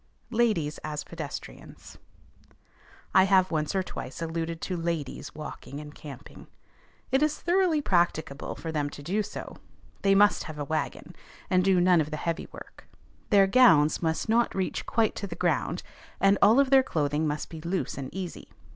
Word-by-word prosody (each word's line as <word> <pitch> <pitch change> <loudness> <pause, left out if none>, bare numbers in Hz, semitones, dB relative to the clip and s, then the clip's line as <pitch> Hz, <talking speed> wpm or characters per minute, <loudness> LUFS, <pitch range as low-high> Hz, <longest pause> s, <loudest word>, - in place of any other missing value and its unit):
LADIES 215 -11 +1
AS 150 -1 -5
PEDESTRIANS. 160 -4 -9 1.1
I 190 - +6
have 190 -1 +4
once 155 +2 -1
or 190 - +1
twice 130 -7 -7
alluded 165 0 -3
to 185 - -3
ladies 165 -5 -4
walking 150 -2 -8
and 150 -1 -9
camping. 145 -2 -11 0.6
It 265 +2 +3
is 305 0 +1
thoroughly 345 -4 +2
practicable 165 - 0
for 165 - -6
them 145 -2 -1
to 145 - -10
do 195 +8 0
so. - - -7 0.4
They 195 0 +4
must 205 +1 +4
have 155 -3 -8
a 145 - -3
wagon, 155 +2 -4 0.4
and 185 0 +4
do 190 -1 +4
none 175 -2 +5
of 150 - -3
the 155 - -4
heavy 165 +2 -3
work; - - -13 0.4
their 200 -3 +6
gowns 190 -9 +5
must 160 -1 -1
not 230 +2 +2
reach 190 -1 -2
quite 225 -2 +2
to 200 - -4
the 170 - -7
ground, 165 -9 -1 0.4
and 195 +1 +4
all 220 +6 +6
of 275 -1 +3
their 270 -1 +8
clothing 155 - -1
must 150 0 -3
be 160 -1 -8
loose 175 +3 -2
and 135 -2 -6
easy. 185 -3 -7
170 Hz, 175 wpm, -27 LUFS, 150-200 Hz, 1.1 s, their